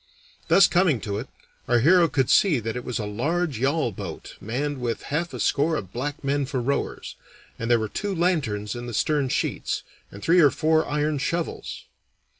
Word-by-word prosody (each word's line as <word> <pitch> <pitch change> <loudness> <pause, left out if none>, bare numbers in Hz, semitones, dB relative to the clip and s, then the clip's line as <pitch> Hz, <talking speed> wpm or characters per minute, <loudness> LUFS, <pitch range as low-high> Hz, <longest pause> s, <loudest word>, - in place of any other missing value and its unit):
Thus 195 - +7
coming 175 -8 +2
to 100 -1 -3
it, 125 - -6 0.4
our 120 - +3
hero 170 +8 +5
could 135 -4 +1
see 170 -10 +4
that 115 +1 -4
it 125 - -4
was 125 - -3
a 110 - -3
large 140 +6 -1
yawl 135 -1 +1
boat - - -8
manned 135 +6 -3
with 120 -2 -2
half 170 +3 -1
a 125 - -7
score 145 +9 +2
of 95 - -5
black 145 +5 -4
men 140 0 0
for 135 -2 -2
rowers, 135 +4 -2 0.4
and 115 - -3
there 120 - +5
were 110 -1 -2
two 200 - -3
lanterns 140 - 0
in 120 0 -6
the 120 - -5
stern 145 +2 +1
sheets, - - -2 0.3
and 100 - -11
three 175 +2 +4
or 150 -4 +7
four 160 +2 +1
iron 150 0 0
shovels. 165 +4 -3
140 Hz, 195 wpm, -24 LUFS, 120-160 Hz, 0.4 s, Thus